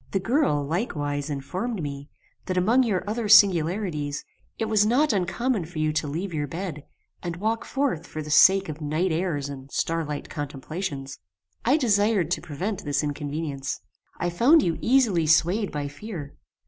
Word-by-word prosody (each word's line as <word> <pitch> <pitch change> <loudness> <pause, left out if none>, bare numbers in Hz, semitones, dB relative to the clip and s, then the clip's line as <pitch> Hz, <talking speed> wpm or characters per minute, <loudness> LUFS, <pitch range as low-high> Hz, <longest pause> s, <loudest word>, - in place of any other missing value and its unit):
The 195 - +2
girl, 195 - +1
likewise, 145 - -2
informed 180 - -3
me, 140 0 -6 0.4
that 185 - -1
among 225 +8 +4
your 210 -6 0
other 215 0 -2
singularities, 175 -6 +4 0.3
it 225 - -1
was 215 -1 +3
not 250 +5 +3
uncommon 200 +2 0
for 165 0 -10
you 155 0 +1
to 155 -1 -1
leave 170 +6 -4
your 145 -2 -2
bed, 165 -2 -5 0.4
and 170 -2 -4
walk 220 +5 -1
forth 270 - -1
for 155 - -6
the 150 - -7
sake 195 +5 +6
of 155 0 -7
night 155 +5 0
airs 160 -4 -1
and 135 -1 -9
starlight 155 -3 -2
contemplations. 145 0 -5 0.4
"I 265 +6 +4
desired 205 - +2
to - - 0
prevent 185 +7 -4
this 145 0 0
inconvenience. 145 -1 -3 0.4
I 175 - -1
found 275 - +5
you 165 -2 -1
easily 225 -11 +3
swayed 175 +6 +3
by 145 -1 -3
fear. 145 0 -8
170 Hz, 160 wpm, -25 LUFS, 145-210 Hz, 0.4 s, sake